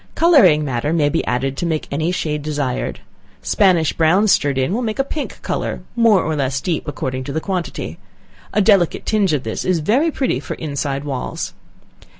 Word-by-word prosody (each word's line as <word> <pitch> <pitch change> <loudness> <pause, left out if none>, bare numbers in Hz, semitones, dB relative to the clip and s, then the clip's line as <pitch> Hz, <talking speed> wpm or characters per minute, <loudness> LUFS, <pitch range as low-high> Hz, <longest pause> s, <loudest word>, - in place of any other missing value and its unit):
Coloring 235 - +5
matter 130 +2 -1
may 150 -3 +2
be 165 - 0
added 135 +2 -1
to - - -2
make 160 -2 -2
any 160 +4 0
shade 150 -4 -2
desired. 145 -4 -3 0.4
Spanish 180 -6 +3
brown 175 +6 +3
stirred 145 -8 +2
in 130 +7 0
will 235 - 0
make 220 -3 -2
a 270 - +2
pink 290 +2 -5
color, - - -3
more 230 -5 +4
or 155 0 -1
less 135 -2 -1
deep 165 -1 -2
according 130 -2 -3
to 140 - -5
the 160 - -1
quantity, 180 0 -4 0.5
a 210 - +2
delicate 195 -5 +3
tinge 205 -5 +2
of 145 -4 0
this 110 - -3
is 185 -2 +1
very 235 - +2
pretty 270 -4 -1
for - - -6
inside 140 -2 -3
walls. 135 -3 -4
160 Hz, 185 wpm, -19 LUFS, 140-200 Hz, 0.5 s, Coloring